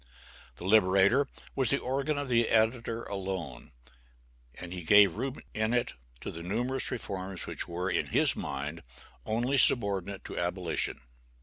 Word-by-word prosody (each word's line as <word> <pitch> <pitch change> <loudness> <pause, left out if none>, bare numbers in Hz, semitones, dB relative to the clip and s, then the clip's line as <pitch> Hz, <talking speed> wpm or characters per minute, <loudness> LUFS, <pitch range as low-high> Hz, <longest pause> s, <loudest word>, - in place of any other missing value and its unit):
The - - -11
"Liberator" 100 +6 +4 0.3
was 130 -3 +1
the 140 - +3
organ 140 +4 -2
of 145 -1 -3
the 120 -2 +2
editor 115 +1 +1
alone, 95 -9 -5 0.8
and 90 0 -8
he 90 - -5
gave 100 +4 +6
room 130 +4 -3 0.2
in 110 +2 0
it 120 - 0 0.3
to - - -5
the 85 - -8
numerous 125 +9 0
reforms 95 -4 -4
which - - -4
were, 90 +2 -3
in - - 0
his - - +3
mind, 75 +4 -5 0.5
only 120 +5 0
subordinate 100 -6 +2
to - - -5
abolition. 90 -1 0
100 Hz, 145 wpm, -29 LUFS, 90-120 Hz, 0.8 s, gave